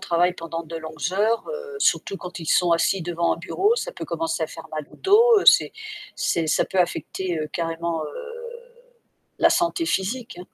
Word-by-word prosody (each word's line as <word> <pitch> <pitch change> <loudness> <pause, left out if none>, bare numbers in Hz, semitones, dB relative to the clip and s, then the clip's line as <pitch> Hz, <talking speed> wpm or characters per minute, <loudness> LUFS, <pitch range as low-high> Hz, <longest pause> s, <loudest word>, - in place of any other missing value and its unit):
travaillent 175 +1 +1
pendant 165 0 -6
de 165 - -9
longues 160 +1 -4
heures, 220 +4 +1
heu, 475 -2 -6
surtout 200 - +1
quand 180 -2 -8
ils 165 - -7
sont 175 +2 +3
assis 175 +2 +2
devant 170 0 0
un - - -13
bureau, 380 - +1
ça - - -3
peut - - -7
commencer 165 0 -2
à 160 - -1
faire 165 - -10
mal 155 -1 -3
au - - -15
dos, 430 +2 +5
c'est - - +6 0.4
c'est 165 -2 0
ça - - +3
peut 190 - -3
affecter, 175 0 -2
heu, 155 - -2
carrément, 165 -1 -2
heu, - - -5 1.3
la - - +6
santé 340 -1 +1
physique, 230 - -2
hein. 180 - -8
175 Hz, 195 wpm, -23 LUFS, 165-235 Hz, 1.3 s, c'est